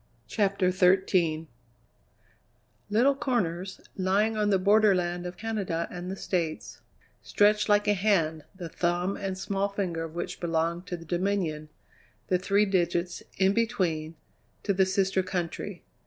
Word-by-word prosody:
CHAPTER 195 Hz, -3 st, +1 dB
XIII 180 Hz, -3 st, +2 dB, 1.4 s
Little 240 Hz, +7 st, +4 dB
corners, 190 Hz, -, -2 dB
lying 200 Hz, +4 st, +1 dB
on 210 Hz, -1 st, +1 dB
the 195 Hz, -, +4 dB
borderland 185 Hz, -3 st, +3 dB
of 180 Hz, 0 st, -8 dB
Canada 200 Hz, -7 st, -2 dB
and 180 Hz, 0 st, -6 dB
the 190 Hz, -, -3 dB
States, 170 Hz, -5 st, -3 dB, 0.4 s
stretched 210 Hz, +1 st, +2 dB
like 205 Hz, 0 st, +4 dB
a 205 Hz, -, +5 dB
hand, 175 Hz, -6 st, +1 dB
the 180 Hz, -3 st, -6 dB
thumb 175 Hz, +3 st, -1 dB
and 195 Hz, -1 st, -4 dB
small 195 Hz, +1 st, -1 dB
finger 185 Hz, -5 st, -2 dB
of 165 Hz, 0 st, -8 dB
which 175 Hz, -, -4 dB
belonged 170 Hz, +1 st, -1 dB
to 175 Hz, -, -4 dB
the 165 Hz, -, -12 dB
Dominion, 175 Hz, -4 st, -1 dB, 0.6 s
the 180 Hz, -, +3 dB
three 200 Hz, +3 st, +2 dB
digits, 175 Hz, -2 st, 0 dB, 0.2 s
in 190 Hz, +1 st, +3 dB
between, 165 Hz, -8 st, -1 dB, 0.5 s
to 200 Hz, -, +1 dB
the 190 Hz, 0 st, +3 dB
sister 190 Hz, 0 st, +1 dB
country. 180 Hz, -3 st, -4 dB
185 Hz, 140 wpm, -28 LUFS, 175-200 Hz, 1.4 s, a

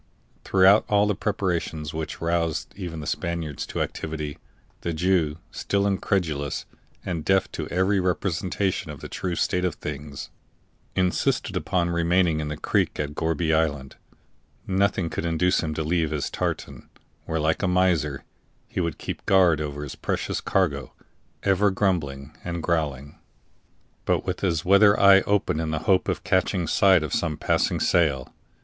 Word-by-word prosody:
Throughout 95 Hz, +2 st, +5 dB
all 105 Hz, 0 st, +4 dB
the 105 Hz, -, +1 dB
preparations 85 Hz, -6 st, -2 dB
which 80 Hz, 0 st, -5 dB
roused 85 Hz, -1 st, -1 dB
even 85 Hz, -5 st, -6 dB
the -, -, -7 dB
Spaniards 80 Hz, -3 st, -3 dB
to -, -, -1 dB
activity, 75 Hz, -2 st, -5 dB, 0.4 s
the 85 Hz, -, -2 dB
Jew, 80 Hz, -2 st, +1 dB
still 100 Hz, 0 st, -1 dB
incredulous 85 Hz, -7 st, -1 dB, 0.4 s
and 85 Hz, -4 st, -3 dB
deaf 95 Hz, +2 st, +2 dB
to -, -, -4 dB
every 95 Hz, +3 st, +1 dB
representation 90 Hz, +1 st, -1 dB
of -, -, -8 dB
the -, -, -6 dB
true 90 Hz, -2 st, -3 dB
state 90 Hz, +2 st, 0 dB
of 90 Hz, -3 st, 0 dB
things, 75 Hz, -1 st, -7 dB, 0.6 s
insisted 90 Hz, -1 st, 0 dB
upon 85 Hz, -1 st, 0 dB
remaining 85 Hz, -1 st, +2 dB
in 75 Hz, -, -3 dB
the 75 Hz, 0 st, -4 dB
creek -, -, 0 dB
at 75 Hz, 0 st, -2 dB
Gourbi 80 Hz, +1 st, 0 dB
Island; 75 Hz, -4 st, 0 dB, 0.7 s
nothing 95 Hz, -2 st, +1 dB
could -, -, -3 dB
induce 85 Hz, +2 st, +2 dB
him 75 Hz, -1 st, -3 dB
to 80 Hz, -, -1 dB
leave 80 Hz, 0 st, +1 dB
his 75 Hz, -2 st, -2 dB
tartan, -, -, -4 dB, 0.4 s
where, 80 Hz, -, -2 dB
like 80 Hz, +1 st, +1 dB
a 95 Hz, -, +1 dB
miser, 90 Hz, -6 st, +1 dB, 0.4 s
he -, -, -4 dB
would 85 Hz, -3 st, -1 dB
keep -, -, -6 dB
guard 90 Hz, -5 st, +4 dB
over 75 Hz, -1 st, -4 dB
his 70 Hz, -, -6 dB
precious -, -, -2 dB
cargo, 70 Hz, -9 st, 0 dB, 0.5 s
ever 100 Hz, +1 st, +3 dB
grumbling 80 Hz, -9 st, -1 dB
and 85 Hz, -1 st, -4 dB
growling, 70 Hz, -5 st, -2 dB, 0.9 s
but -, -, +1 dB
with -, -, -2 dB
his 85 Hz, -5 st, 0 dB
weather 100 Hz, +2 st, +6 dB
eye 100 Hz, -1 st, +7 dB
open 100 Hz, -6 st, +1 dB
in 80 Hz, -1 st, -2 dB
the 80 Hz, -, -1 dB
hope 95 Hz, -2 st, +3 dB
of -, -, -2 dB
catching 95 Hz, -1 st, +1 dB
sight 95 Hz, +1 st, +4 dB
of 75 Hz, -, -4 dB
some 75 Hz, -2 st, -1 dB
passing -, -, +1 dB
sail. 70 Hz, -8 st, +1 dB
85 Hz, 155 wpm, -25 LUFS, 75-95 Hz, 0.9 s, eye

